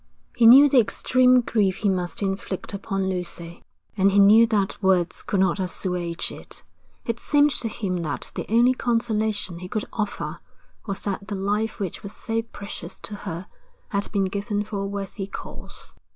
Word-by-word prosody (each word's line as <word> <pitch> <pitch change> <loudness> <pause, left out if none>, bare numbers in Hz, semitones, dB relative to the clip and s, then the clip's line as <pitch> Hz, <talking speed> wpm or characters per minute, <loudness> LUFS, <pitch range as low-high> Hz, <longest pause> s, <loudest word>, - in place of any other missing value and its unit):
He 230 - +6
knew 270 +5 +10
the 275 -2 +5
extreme 250 +2 +4
grief 200 -5 +1
he - - +5
must 180 +1 -2
inflict 195 0 -3
upon 195 -1 -2
Lucy, 175 -2 -5 0.3
and 195 -1 +4
he 200 - +2
knew 210 +3 +7
that 205 -4 0
words 185 -3 +2
could 200 - -1
not 190 0 +2
assuage 180 -2 -2
it. - - -8 0.4
It 230 0 -2
seemed 290 +2 +3
to 245 -2 -1
him 200 -4 -3
that 155 -4 -4
the - - -5
only 240 +3 +5
consolation 220 -7 -1
he 180 - -7
could 215 +3 -3
offer 210 -2 -3 0.5
was 195 -1 -3
that 200 0 -3
the 200 - -3
life 205 +3 -1
which 190 -5 -4
was 200 - -8
so 225 0 -2
precious 205 -3 -9
to 210 - -7
her 185 -3 -6 0.4
had 200 0 -2
been 200 -2 +1
given 205 +2 -2
for 210 -1 -5
a 195 - -2
worthy 195 0 -5
cause. - - -9
200 Hz, 175 wpm, -24 LUFS, 190-225 Hz, 0.5 s, knew